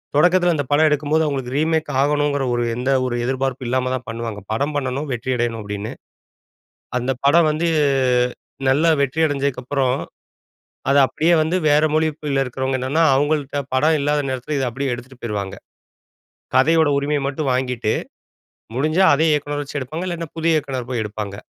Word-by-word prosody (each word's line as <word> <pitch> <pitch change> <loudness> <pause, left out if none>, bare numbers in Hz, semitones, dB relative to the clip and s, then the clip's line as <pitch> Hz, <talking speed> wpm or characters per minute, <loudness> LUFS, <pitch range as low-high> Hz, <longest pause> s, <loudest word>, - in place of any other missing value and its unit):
தொடக்கத்துல 175 +2 +4
அந்த 145 -2 -1
படம் 155 +2 +5
எடுக்கும்போது 150 +2 +1
அவுங்களுக்கு 135 -3 -3
ரீமேக் 160 0 +1
ஆகணுங்குற 145 -1 +1
ஒரு 120 0 0
எந்த 125 +2 -2 0.2
ஒரு 120 -1 -2
எதிர்பார்ப்பும் 130 0 -2
இல்லாம 130 +1 0
தான் 125 -1 -4
பண்ணுவாங்க. 115 -2 -5
படம் 140 +7 -1
பண்ணனும் 140 +1 -2
வெற்றியடையணும் 120 -1 -1
அப்பிடின்னு. 105 +1 -5 1.1
அந்த 125 +2 -2
படம் 155 +3 +5
வந்து 165 +3 0 1.0
நல்லா 155 +5 +4
வெற்றி 140 +3 0
அடைஞ்சதுக்கு 140 -3 -1
அப்புறம், 135 -1 0 0.9
அத 140 - +4
அப்பிடியே 170 +5 +2
வந்து 165 +4 0
வேற 150 +1 +4
மொழியில 150 -3 0
இருக்கிறவங்க 130 +1 -2
என்னன்னா, 150 +6 +1
அவுங்கள்ட 145 -1 0
படம் 155 +4 +3
இல்லாத 145 +1 +1
நேரத்துல, 130 +3 -3
இத 130 - 0
அப்பிடியே 135 +1 -2
எடுத்துட்டு 125 +1 -11
போயிருவாங்க. 100 -4 -4 1.0
கதையோட 160 +3 +4
உரிமைய 145 +1 0
மட்டும் 140 -1 -2
வாங்கிட்டு 125 -4 -1 0.8
முடிஞ்சா 155 +8 +2
அதே 160 +3 +2
இயக்குனர 145 0 -1
வச்சு 145 0 -5
எடுப்பாங்க, 155 +8 -5
இல்லாட்ன்னா, 170 -3 -5
புதிய 165 0 +2
இயக்குனர் 130 -4 -3
போய் 120 -3 -1
எடுப்பாங்க. 105 -1 -5
140 Hz, 150 wpm, -20 LUFS, 125-155 Hz, 1.1 s, படம்